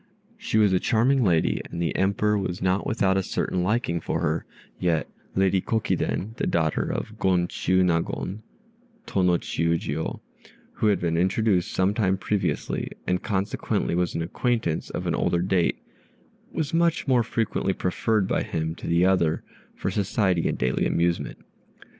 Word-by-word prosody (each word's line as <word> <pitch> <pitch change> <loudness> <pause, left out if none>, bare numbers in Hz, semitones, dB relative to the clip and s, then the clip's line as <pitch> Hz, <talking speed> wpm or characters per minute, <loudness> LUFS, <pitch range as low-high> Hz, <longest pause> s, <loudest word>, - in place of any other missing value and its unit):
She 230 - -2
was 105 -3 +4
a 90 - +4
charming 125 +6 +3
lady, 85 -6 +2
and 85 - -6
the 85 -1 -1
Emperor 100 +2 +2
was 95 -3 -2
not 95 +1 0
without 95 -3 +2
a - - +2
certain 90 -1 -1
liking 90 -3 0
for - - -2
her; - - -1 0.3
yet 85 -3 +1 0.3
Lady 95 0 +3
Kokiden, 110 -1 -1
the - - -1
daughter 80 -2 0
of - - -5
Gon 90 -2 +2
Chiûnagon 90 +2 0 0.7
(Tô 95 - 0
no 90 -1 +4
Chiûjiô), 80 -2 -1 0.5
who 110 - 0
had 105 - +3
been 85 -1 0
introduced 95 +1 +2
some 95 +2 +2
time 95 -3 +1
previously, 100 +1 -1 0.2
and 90 0 0
consequently 100 -2 -1
was 90 0 0
an 85 - -1
acquaintance 110 -2 -1
of - - -4
an - - 0
older 85 0 +1
date, 90 -2 +1 0.7
was 155 -2 -2
much 165 -2 +2
more 125 -3 +4
frequently 110 -4 -1
preferred 95 +2 0
by - - +1
him 80 0 -2
to - - -8
the 85 +2 +3
other 85 -4 +2 0.3
for - - -2
society 95 -4 +1
in - - 0
daily 65 0 0
amusement. 85 0 0
95 Hz, 160 wpm, -25 LUFS, 85-105 Hz, 0.7 s, was